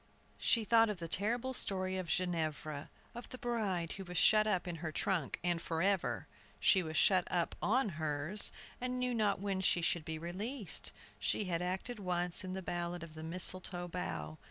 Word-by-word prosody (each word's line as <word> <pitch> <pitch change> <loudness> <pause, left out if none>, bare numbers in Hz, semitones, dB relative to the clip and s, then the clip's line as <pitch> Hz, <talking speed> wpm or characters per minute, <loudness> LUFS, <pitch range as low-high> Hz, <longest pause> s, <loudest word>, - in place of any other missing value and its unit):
She 230 - +3
thought 225 +1 +5
of 210 - -2
the 170 -1 -5
terrible 235 +9 +1
story 185 -5 0
of 185 -2 -3
Ginevra, 155 -4 -1 0.2
of 240 +1 -8
the 255 - -6
bride 205 -9 -1
who 195 - -5
was 180 -1 -5
shut 215 0 +6
up 185 -3 +1
in 170 -1 -3
her 160 0 -4
trunk, 165 -2 -1
and 175 -1 +1
forever! 180 +4 0 0.3
She 190 - +5
was 160 -2 -3
shut 185 -3 +4
up 175 -2 0
on 240 +2 +2
hers, 155 +3 0 0.3
and 250 0 -1
knew 250 0 0
not 210 -4 +2
when 195 -1 -1
she 175 -2 +3
should 170 -1 +1
be 160 0 -4
released! 195 - -1 0.3
She - - +1
had 175 -2 -1
acted 190 +6 -3
once 180 -1 0
in 185 0 -4
the 190 0 -4
ballad 175 0 -3
of 165 -2 -9
the 155 - -8
"Mistletoe 175 +1 0
Bough." 170 -3 -4
185 Hz, 185 wpm, -35 LUFS, 170-210 Hz, 0.3 s, shut